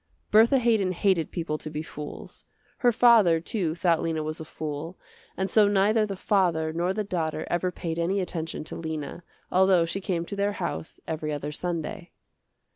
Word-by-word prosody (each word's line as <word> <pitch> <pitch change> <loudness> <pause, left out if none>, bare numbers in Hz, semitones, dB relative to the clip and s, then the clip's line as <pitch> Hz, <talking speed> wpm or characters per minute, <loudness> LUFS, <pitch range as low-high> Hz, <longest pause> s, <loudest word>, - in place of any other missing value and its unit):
Bertha 225 +5 +6
Haydon 220 -7 +2
hated 185 -3 +1
people 160 -3 -3
to 155 - -6
be 150 0 -4
fools. 150 -1 -9 0.4
Her 245 -2 +4
father, 220 -8 +5
too, 170 -2 -2
thought 170 -2 +2
Lena 160 -2 -1
was 155 +2 -4
a - - -5
fool, 155 +3 -6 0.4
and 190 - 0
so 210 +2 +5
neither 205 +2 +3
the 195 - -4
father 175 -5 +1
nor 175 +3 0
the 215 +2 -1
daughter 160 -5 -2
ever 175 +1 0
paid 165 -2 -4
any 185 +4 +1
attention 165 -4 -4
to - - -7
Lena, 160 0 -5 0.3
although 185 -2 +4
she 190 +4 -4
came 175 -4 -2
to 200 - -6
their 200 +1 0
house 170 -3 -5
every 155 -1 -3
other 145 0 -3
Sunday. 175 +3 -4
175 Hz, 180 wpm, -26 LUFS, 160-200 Hz, 0.4 s, Bertha